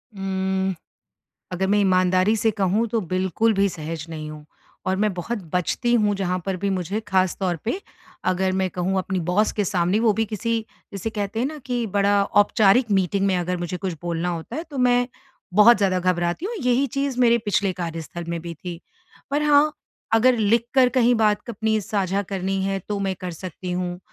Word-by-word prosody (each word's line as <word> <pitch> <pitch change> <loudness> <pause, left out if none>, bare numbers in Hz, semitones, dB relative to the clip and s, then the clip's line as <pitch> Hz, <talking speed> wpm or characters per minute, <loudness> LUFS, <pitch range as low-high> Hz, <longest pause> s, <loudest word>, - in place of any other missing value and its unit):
उम, 190 0 -1 0.8
अगर 185 +1 0
मैं 205 +2 +3
ईमानदारी 185 +1 +3
से 220 +1 +2
कहूँ 205 +2 +1
तो 225 +1 0
बिल्कुल 190 +4 0
भी 200 0 +3
सहज 160 -2 -6
नहीं 155 -1 -6
हूँ। 150 -1 -10 0.4
और 190 0 +1
मैं 210 -1 +2
बहुत 200 +7 -3 0.2
बचती 210 +7 0
हूँ 210 -3 +3
जहाँ 185 -2 -1
पर 190 -1 -1
भी 200 - +1
मुझे 190 +2 -2
ख़ासतौर 185 -1 +1
पे 345 - -2 0.5
अगर 185 0 +1
मैं 190 0 0
कहूँ 185 +2 -1
अपनी 185 0 -2
बॉस 210 +4 +2
के 205 - -1
सामने 180 +1 +1
वो 225 -2 +4
भी 225 +2 0
किसी 225 +2 -1 0.3
जिसे 200 +3 -4
कहते 210 0 -3
हैं 250 - +1
न 305 +2 -6
कि 245 -2 -1
बड़ा 200 0 +3
औपचारिक 205 +3 +3
मीटिंग 195 0 +1
में 190 -2 +2
अगर 180 +1 -1
मुझे 175 0 -4
कुछ 185 0 -3
बोलना 170 0 -2
होता 170 +7 -4
है 320 - -3
तो 280 - -6
मैं, 245 -1 +3 0.5
बहुत 215 +4 +8
ज़्यादा 195 -2 +1
घबराती 175 - 0
हूँ 470 - -4
यही 250 +1 +2
चीज़ 275 0 -2
मेरे 235 -1 +5
पिछले 205 -3 0
कार्यस्थल 170 -1 -5
में 170 0 -3
भी 170 0 -6
थी। 170 +2 -8 0.5
पर 290 +2 +1
हाँ, 300 0 +4 0.4
अगर 245 +3 +5
लिख 225 +1 +2
कर 260 -2 +6
कहीं 245 -1 +3
बात 215 0 +1
अपनी 220 0 0
साझा 200 -1 -1
करनी 195 0 -2
है, 195 0 -1
तो 205 -1 -1
मैं 195 -1 -1
कर 180 - -4
सकती 180 +2 -7
हूँ 180 0 -3
195 Hz, 195 wpm, -23 LUFS, 180-225 Hz, 0.8 s, बहुत